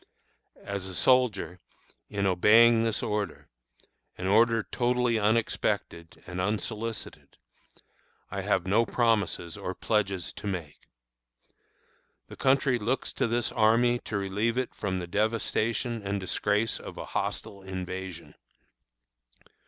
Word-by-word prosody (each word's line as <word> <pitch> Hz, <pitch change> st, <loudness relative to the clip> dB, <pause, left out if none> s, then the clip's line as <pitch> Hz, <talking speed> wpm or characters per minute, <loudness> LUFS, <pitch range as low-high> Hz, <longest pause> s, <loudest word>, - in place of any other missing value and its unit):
As 100 Hz, -1 st, -4 dB
a 95 Hz, -, -7 dB
soldier, 105 Hz, -8 st, +2 dB, 0.5 s
in 100 Hz, -1 st, -1 dB
obeying 115 Hz, +5 st, +6 dB
this 115 Hz, -2 st, 0 dB
order 105 Hz, -6 st, -3 dB, 0.7 s
an 90 Hz, -, -5 dB
order 115 Hz, +3 st, +4 dB
totally 125 Hz, -2 st, +1 dB
unexpected 105 Hz, -5 st, -1 dB
and 90 Hz, +1 st, -4 dB
unsolicited 110 Hz, +3 st, -4 dB, 0.9 s
I 100 Hz, +1 st, -3 dB
have 95 Hz, -2 st, +1 dB
no 105 Hz, +5 st, +3 dB
promises 105 Hz, -7 st, 0 dB
or 95 Hz, -, -5 dB
pledges 100 Hz, -5 st, -1 dB
to -, -, -7 dB
make. 85 Hz, -7 st, -5 dB, 1.4 s
The -, -, -9 dB
country 130 Hz, -2 st, +2 dB
looks 120 Hz, +5 st, -1 dB
to -, -, 0 dB
this 120 Hz, 0 st, 0 dB
army 120 Hz, +2 st, +3 dB
to 105 Hz, -, -4 dB
relieve 105 Hz, +5 st, -1 dB
it 130 Hz, -1 st, -1 dB
from 95 Hz, -3 st, -2 dB
the 90 Hz, -, -3 dB
devastation 110 Hz, +4 st, -1 dB
and 100 Hz, 0 st, -2 dB
disgrace 105 Hz, +4 st, 0 dB
of -, -, -9 dB
a -, -, -5 dB
hostile 100 Hz, -, -4 dB
invasion. 95 Hz, -2 st, -6 dB
105 Hz, 120 wpm, -28 LUFS, 95-115 Hz, 1.4 s, obeying